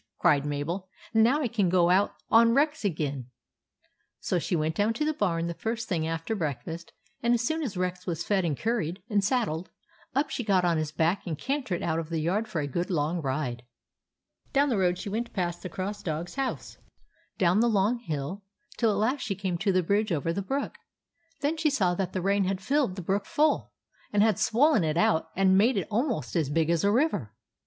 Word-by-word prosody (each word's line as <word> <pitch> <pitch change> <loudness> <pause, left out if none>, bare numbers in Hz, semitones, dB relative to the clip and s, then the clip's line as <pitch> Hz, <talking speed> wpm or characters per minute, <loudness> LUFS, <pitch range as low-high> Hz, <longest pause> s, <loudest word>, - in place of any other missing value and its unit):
" - - -62
cried 145 0 +3
Mabel. 165 +6 -3
" - - -21
Now 240 +7 +4
I - - +1
can 210 -5 +1
go 175 -1 +4
out 195 +3 +3 0.2
on 230 +1 +6
Rex 295 -1 +2
again! 145 - -2 0.5
" - - -40 0.3
So 180 - 0
she 175 - -1
went 155 0 0
down 205 +6 +1
to 300 +7 -1
the 310 - +1
barn 170 - 0
the 170 - -2
first 225 +5 -3
thing 160 -4 -1
after 165 +6 -2
breakfast, 165 - -4 0.3
and 235 +1 +3
as 235 - -1
soon 315 +5 0
as 225 -11 -3
Rex 180 0 -3
was 170 -1 -2
fed 200 -3 +1
and 155 -5 -1
curried 210 -6 -2
and 205 -1 +2
saddled, 200 - 0 0.5
up 280 +1 +1
she 245 - -2
got 190 -4 +2
on 170 -2 +2
his 155 -1 -2
back 165 +6 0
and 160 -3 -2
cantered 260 - -2
out 160 -1 0
of 165 -1 -5
the 165 - -2
yard 185 +8 0
for 170 -7 -2
a - - -2
good 175 +6 -2
long 165 0 0
ride. 130 -3 -2 0.9
Down 285 +1 +3
the 235 - +1
road 180 -1 +2
she - - -6
went 230 +4 -3
past 175 -3 -2
the 185 - -6
Cross 195 +4 -4
Dog's 165 +1 -4
house, 270 -1 -4 0.6
down 180 +2 +3
the 235 +1 +4
long 215 +3 +2
hill, 160 - -4 0.4
till 230 - +3
at 205 - +1
last 250 +7 +1
she 200 - -2
came 185 -3 -2
to 200 +1 +2
the 185 -1 +2
bridge 205 +4 +1
over 165 +1 0
the 200 - -2
brook. 270 +9 -3 0.6
Then 295 +3 0
she 315 -1 +2
saw 195 -11 +2
that 185 0 -2
the 185 - -3
rain 200 0 +2
had 190 0 -1
filled 265 -2 +1
the 185 - -6
brook 195 +3 -1
full, 305 +1 +1 0.4
and 205 0 +4
had 215 -4 +2
swollen 250 - +4
it 155 0 0
out 160 -2 +2
and 190 0 +4
made 230 +2 +3
it 195 - -1
almost 235 0 -1
as 160 -5 +1
big 165 +2 +1
as 170 -2 +1
a 200 - +4
river. 235 - 0
190 Hz, 225 wpm, -28 LUFS, 165-225 Hz, 0.9 s, on